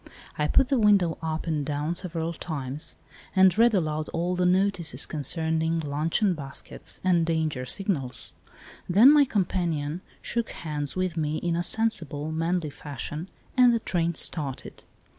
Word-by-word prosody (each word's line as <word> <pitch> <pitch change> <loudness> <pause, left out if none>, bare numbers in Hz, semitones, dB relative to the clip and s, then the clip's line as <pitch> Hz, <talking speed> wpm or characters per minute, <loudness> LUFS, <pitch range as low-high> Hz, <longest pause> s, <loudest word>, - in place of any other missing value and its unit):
I 150 - 0
put 270 - +3
the 270 -3 +2
window 200 -6 +3
up 160 -1 -3
and 155 -3 -1
down 150 +3 -2
several 170 -2 -3
times 145 -3 -5 0.4
and 190 -1 +6
read 230 0 +5
aloud 155 -3 -1
all 175 +2 -1
the 180 0 +2
notices 180 -7 +1
concerning 160 +2 0
luncheon 160 +6 0
baskets 140 -3 -6
and 180 -2 +3
danger 160 -6 -1
signals. 135 - -1 0.6
Then 215 +10 +8
my 295 -1 +6
companion 175 - -1 0.2
shook 235 -1 -3
hands 150 -3 -4
with 185 -2 -1
me 155 -1 -1
in 170 -1 -1
a 170 - 0
sensible, 175 -8 0
manly 165 0 -1
fashion, 150 +5 -6 0.3
and 250 -2 +6
the - - +1
train 170 -5 -1
started. 145 -5 -2
165 Hz, 145 wpm, -26 LUFS, 150-185 Hz, 0.6 s, Then